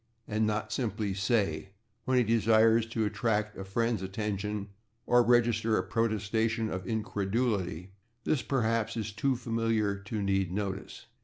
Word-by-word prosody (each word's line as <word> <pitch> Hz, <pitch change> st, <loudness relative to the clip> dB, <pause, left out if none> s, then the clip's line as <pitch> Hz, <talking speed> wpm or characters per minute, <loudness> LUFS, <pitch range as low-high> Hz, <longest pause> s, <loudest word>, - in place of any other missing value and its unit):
and 110 Hz, 0 st, +1 dB
not 105 Hz, 0 st, -2 dB
simply 105 Hz, -5 st, -1 dB
"say!" 95 Hz, -4 st, 0 dB, 0.4 s
when 130 Hz, 0 st, +2 dB
he 125 Hz, -, +5 dB
desires 115 Hz, 0 st, +4 dB
to 115 Hz, -1 st, -1 dB
attract 105 Hz, 0 st, -1 dB
a 95 Hz, -, -6 dB
friend's 115 Hz, +2 st, -1 dB
attention 105 Hz, +1 st, -3 dB, 0.4 s
or 120 Hz, 0 st, +5 dB
register 115 Hz, -2 st, +3 dB
a -, -, 0 dB
protestation 110 Hz, 0 st, 0 dB
of 95 Hz, 0 st, -4 dB
incredulity 100 Hz, -4 st, -1 dB, 0.3 s
this 150 Hz, -, +1 dB
perhaps 115 Hz, -3 st, 0 dB
is 110 Hz, -1 st, -3 dB
too 135 Hz, +5 st, 0 dB
familiar 115 Hz, -3 st, 0 dB
to 100 Hz, +1 st, -4 dB
need 95 Hz, -2 st, +1 dB
notice. 95 Hz, 0 st, -4 dB
110 Hz, 140 wpm, -30 LUFS, 100-115 Hz, 0.4 s, he